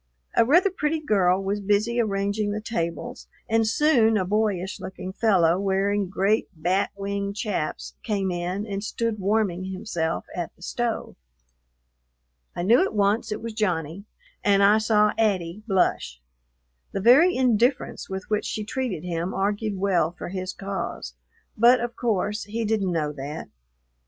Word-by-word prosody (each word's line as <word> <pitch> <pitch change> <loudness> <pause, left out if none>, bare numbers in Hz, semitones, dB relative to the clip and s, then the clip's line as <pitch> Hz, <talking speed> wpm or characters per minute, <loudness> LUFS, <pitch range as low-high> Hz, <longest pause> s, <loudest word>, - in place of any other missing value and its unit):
A - - +6
rather 345 - +4
pretty 315 -3 -1
girl 195 -9 +2
was 200 +2 -1
busy 210 +4 +1
arranging 200 0 -1
the 205 +1 -2
tables, 170 -7 -4 0.2
and 225 -1 +2
soon 225 -3 +3
a 190 - 0
boyish 205 -2 -1
looking 190 0 -7
fellow, 185 -6 +3
wearing 195 0 0
great 200 +3 +1
bat 180 +5 0
wing 200 0 -3
chaps, 205 -8 -3
came 200 -4 -1
in 180 +4 -3
and 200 -2 -4
stood 225 0 -2
warming 195 -2 0
himself 185 -4 -3
at 175 -2 -4
the 175 - -16
stove. 240 +3 -3 1.4
I 175 - -3
knew 230 +7 +5
at 390 - -3
once 210 +3 +1
it 210 - -4
was 230 -1 -5
Johnny, 180 -3 -2 0.4
and 200 -1 +4
I 210 +2 +6
saw 210 -1 +3
"'Attie" 195 -3 0
blush. 125 - 0 0.7
The - - -1
very 270 - +6
indifference 250 0 +1
with 190 0 -4
which 210 -1 -1
she 215 - -3
treated 225 -7 -3
him 175 +1 -3
argued 205 +1 -1
well 185 -5 +2
for - - -6
his 185 0 -4
cause, 195 - -5 0.4
but 240 +3 +6
of 240 0 -4
course 210 -2 -1
he 225 +2 -3
didn't 205 -4 0
know 155 -3 -1
that. 145 +2 -7
200 Hz, 150 wpm, -25 LUFS, 185-220 Hz, 1.4 s, A